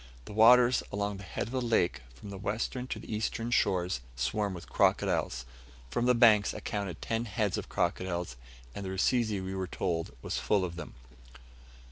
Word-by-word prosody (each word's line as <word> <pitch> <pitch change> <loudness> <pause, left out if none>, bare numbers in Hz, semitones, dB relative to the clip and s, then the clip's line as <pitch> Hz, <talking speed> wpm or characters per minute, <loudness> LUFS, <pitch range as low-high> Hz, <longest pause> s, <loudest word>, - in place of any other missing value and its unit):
The - - -9
waters 120 +3 +6
along 100 0 -2
the 100 - -9
head - - -3
of 115 - -9
the 130 -1 -1
lake, 90 - +1
from 100 +11 -10
the 100 - -7
western 115 +5 -2
to - - -4
the - - -7
eastern 115 +2 -2
shores, 90 - +1
swarm 95 +10 -1
with 85 - -9
crocodiles. - - +1 0.5
From 120 - 0
the 125 - +5
banks, 110 -4 +5
I - - -4
counted 100 -5 -4
ten 115 +1 -1
heads 105 -2 -1
of - - -5
crocodiles, 90 -5 -1 0.4
and 100 - -6
the 95 - -4
Rusizi, 110 +2 +1
we 95 0 -5
were 95 -1 -3
told, 85 -3 -2
was - - -2
full 100 -3 +2
of 85 -2 -6
them. 85 - -8
100 Hz, 185 wpm, -30 LUFS, 90-115 Hz, 0.5 s, waters